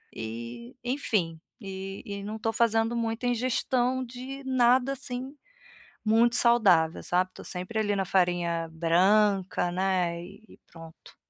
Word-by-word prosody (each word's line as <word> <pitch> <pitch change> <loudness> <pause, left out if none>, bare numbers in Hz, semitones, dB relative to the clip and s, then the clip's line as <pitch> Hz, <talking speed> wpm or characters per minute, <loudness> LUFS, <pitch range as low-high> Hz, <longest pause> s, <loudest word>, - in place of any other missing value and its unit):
e 115 - -7
enfim, 210 - 0 0.2
e 195 -1 -7
e 200 -1 -6
não 210 +2 -5
estou 225 +1 -2
fazendo 225 0 +2
muita 230 +1 -2
ingestão 250 +1 0
de 255 +3 -8
nada, 255 0 +3
assim, 265 0 -4 0.7
muito 230 +2 +3
saudável 190 -10 +4
sabe. 180 +1 +1
Estou - - -12
sempre 185 +5 -5
ali 205 -1 +1
na 195 - 0
farinha 175 -3 +1
branca, 185 +3 +2
né, 180 -2 0
e 205 +4 -15
pronto. 165 -1 -14
210 Hz, 130 wpm, -27 LUFS, 180-240 Hz, 0.7 s, saudável